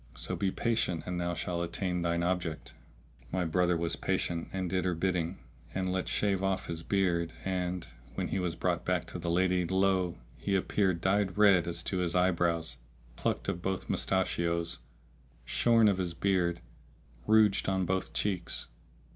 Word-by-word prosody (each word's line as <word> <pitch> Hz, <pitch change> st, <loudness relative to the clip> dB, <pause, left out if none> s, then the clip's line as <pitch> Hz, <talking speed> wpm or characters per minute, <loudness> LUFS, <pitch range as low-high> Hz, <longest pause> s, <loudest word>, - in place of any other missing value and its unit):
So -, -, -3 dB
be 100 Hz, -, 0 dB
patient 100 Hz, -6 st, 0 dB
and 90 Hz, -1 st, -2 dB
thou 85 Hz, 0 st, -1 dB
shalt 85 Hz, +1 st, -2 dB
attain 90 Hz, +1 st, -2 dB
thine 85 Hz, 0 st, 0 dB
object." 85 Hz, -3 st, -2 dB, 0.6 s
My 90 Hz, -1 st, 0 dB
brother 90 Hz, +1 st, +2 dB
was 85 Hz, 0 st, 0 dB
patient 85 Hz, -1 st, -1 dB
and 95 Hz, -1 st, -2 dB
did 90 Hz, 0 st, 0 dB
her 90 Hz, -2 st, 0 dB
bidding 90 Hz, 0 st, -1 dB, 0.4 s
and 95 Hz, -1 st, 0 dB
let 95 Hz, -1 st, -1 dB
shave 100 Hz, -2 st, +1 dB
off 95 Hz, -1 st, 0 dB
his 85 Hz, -1 st, -4 dB
beard 85 Hz, -3 st, +1 dB
and, 90 Hz, -1 st, -1 dB, 0.3 s
when -, -, -2 dB
he 95 Hz, -, -1 dB
was 90 Hz, -2 st, -1 dB
brought -, -, 0 dB
back -, -, 0 dB
to -, -, -7 dB
the 85 Hz, -, -3 dB
lady, 90 Hz, +1 st, +2 dB
lo! 95 Hz, -2 st, +2 dB, 0.2 s
he 100 Hz, -, -1 dB
appeared 95 Hz, -2 st, +1 dB
dyed 95 Hz, 0 st, +1 dB
red 100 Hz, -5 st, +6 dB
as 85 Hz, -1 st, -2 dB
to 95 Hz, -, -2 dB
his 90 Hz, -1 st, -1 dB
eyebrows, 85 Hz, -6 st, +1 dB, 0.4 s
plucked -, -, -1 dB
of 95 Hz, -3 st, -2 dB
both 95 Hz, +1 st, -2 dB
mustachios, 85 Hz, -2 st, 0 dB, 0.7 s
shorn 115 Hz, -, +4 dB
of 100 Hz, -2 st, +2 dB
his 85 Hz, -2 st, -2 dB
beard, 90 Hz, -3 st, +1 dB, 0.7 s
rouged 110 Hz, -3 st, +4 dB
on 95 Hz, -1 st, +1 dB
both 95 Hz, +1 st, -1 dB
cheeks. 90 Hz, -5 st, -1 dB
90 Hz, 165 wpm, -31 LUFS, 85-95 Hz, 0.7 s, red